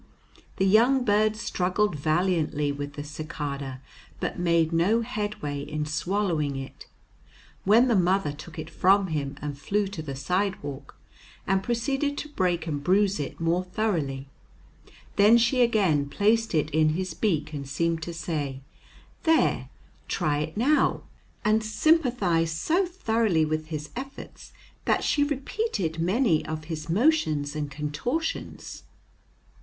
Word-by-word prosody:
The 190 Hz, -, +2 dB
young 240 Hz, +6 st, +4 dB
bird 215 Hz, +1 st, +3 dB
struggled 200 Hz, -2 st, 0 dB
valiantly 155 Hz, -1 st, +1 dB
with 145 Hz, 0 st, -5 dB
the 145 Hz, -, -6 dB
cicada, 145 Hz, -3 st, -5 dB, 0.4 s
but -, -, -3 dB
made 170 Hz, -2 st, +2 dB
no 195 Hz, +8 st, +3 dB
headway 210 Hz, -, -3 dB
in 150 Hz, +1 st, -3 dB
swallowing 160 Hz, -2 st, -1 dB
it, 135 Hz, 0 st, -8 dB, 0.8 s
when 225 Hz, +6 st, +6 dB
the 235 Hz, -, +3 dB
mother 185 Hz, -3 st, +2 dB
took 160 Hz, +3 st, -11 dB
it 155 Hz, 0 st, -5 dB
from 195 Hz, +1 st, +3 dB
him 145 Hz, -3 st, -3 dB
and 145 Hz, -1 st, -3 dB
flew 200 Hz, +9 st, 0 dB
to 195 Hz, -5 st, -6 dB
the 140 Hz, -3 st, -6 dB
sidewalk, 165 Hz, -1 st, -3 dB, 0.5 s
and 195 Hz, 0 st, +2 dB
proceeded 270 Hz, +6 st, -1 dB
to 300 Hz, -, -5 dB
break 180 Hz, -, 0 dB
and 145 Hz, -3 st, -3 dB
bruise 195 Hz, +3 st, +3 dB
it 145 Hz, -, -5 dB
more 165 Hz, +2 st, +1 dB
thoroughly. 165 Hz, -9 st, -2 dB, 0.9 s
Then 210 Hz, +3 st, +7 dB
she 235 Hz, +2 st, +3 dB
again 190 Hz, -12 st, +2 dB
placed 220 Hz, +4 st, +2 dB
it 155 Hz, 0 st, +1 dB
in 155 Hz, +1 st, +3 dB
his 185 Hz, -1 st, -3 dB
beak, 155 Hz, -5 st, -1 dB
and 140 Hz, -2 st, -5 dB
seemed 165 Hz, +3 st, 0 dB
to 170 Hz, -, -4 dB
say, 150 Hz, -5 st, -3 dB, 0.6 s
"There, 320 Hz, -1 st, +2 dB, 0.4 s
try 145 Hz, -1 st, 0 dB
it 155 Hz, +5 st, -4 dB
now," 285 Hz, +7 st, +2 dB, 0.4 s
and 215 Hz, +1 st, +3 dB
sympathized 215 Hz, -, +2 dB
so 355 Hz, -, +1 dB
thoroughly 225 Hz, -, +1 dB
with 155 Hz, 0 st, -2 dB
his 150 Hz, -2 st, -5 dB
efforts 270 Hz, +2 st, -8 dB, 0.3 s
that -, -, +2 dB
she 290 Hz, -, +2 dB
repeated 275 Hz, -, -2 dB
many 185 Hz, 0 st, +2 dB
of 155 Hz, 0 st, -5 dB
his 155 Hz, 0 st, -6 dB
motions 165 Hz, -, +2 dB
and 150 Hz, -1 st, -3 dB
contortions. 150 Hz, -, -4 dB
175 Hz, 140 wpm, -26 LUFS, 150-215 Hz, 0.9 s, Then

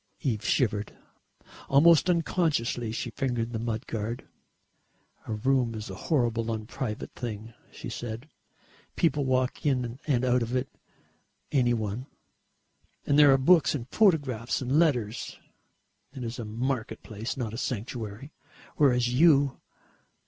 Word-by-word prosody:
Eve 115 Hz, -8 st, -1 dB
shivered. 105 Hz, -5 st, 0 dB, 0.7 s
Almost 165 Hz, +5 st, +6 dB
unconsciously 155 Hz, -9 st, 0 dB
she 120 Hz, +1 st, -4 dB
fingered 120 Hz, -2 st, -2 dB
the 110 Hz, -, -2 dB
mud 115 Hz, 0 st, -3 dB
guard. 115 Hz, +2 st, -4 dB, 1.0 s
"A 110 Hz, -, -2 dB
room 120 Hz, +1 st, +1 dB
is 110 Hz, 0 st, -6 dB
a -, -, -9 dB
horrible 115 Hz, -6 st, +1 dB
unprivate 110 Hz, +1 st, -4 dB
thing," 115 Hz, -1 st, -6 dB, 0.2 s
she -, -, -8 dB
said. 120 Hz, +3 st, -6 dB, 0.7 s
"People 150 Hz, -4 st, +1 dB
walk 130 Hz, +1 st, 0 dB
in 125 Hz, -4 st, 0 dB
and 130 Hz, -4 st, +2 dB
out 125 Hz, 0 st, +3 dB
of 115 Hz, +2 st, -2 dB
it, 130 Hz, +1 st, -1 dB, 0.8 s
any 120 Hz, -4 st, +3 dB
one, 110 Hz, +4 st, -4 dB, 1.0 s
and 145 Hz, +1 st, +3 dB
there 145 Hz, -2 st, +8 dB
are 135 Hz, -, +6 dB
books 160 Hz, +3 st, +4 dB
and 125 Hz, -4 st, -5 dB
photographs 145 Hz, -, +2 dB
and 135 Hz, +4 st, +1 dB
letters. 125 Hz, -9 st, 0 dB, 0.8 s
It 130 Hz, -, -5 dB
is 115 Hz, +1 st, -5 dB
a 115 Hz, -, -4 dB
market 115 Hz, 0 st, -3 dB
place, 110 Hz, +4 st, -5 dB
not 115 Hz, -4 st, -3 dB
a -, -, -5 dB
sanctuary, 120 Hz, +1 st, -5 dB, 0.4 s
whereas 125 Hz, -4 st, +4 dB
you...." 140 Hz, -1 st, +4 dB
125 Hz, 135 wpm, -28 LUFS, 115-140 Hz, 1.0 s, there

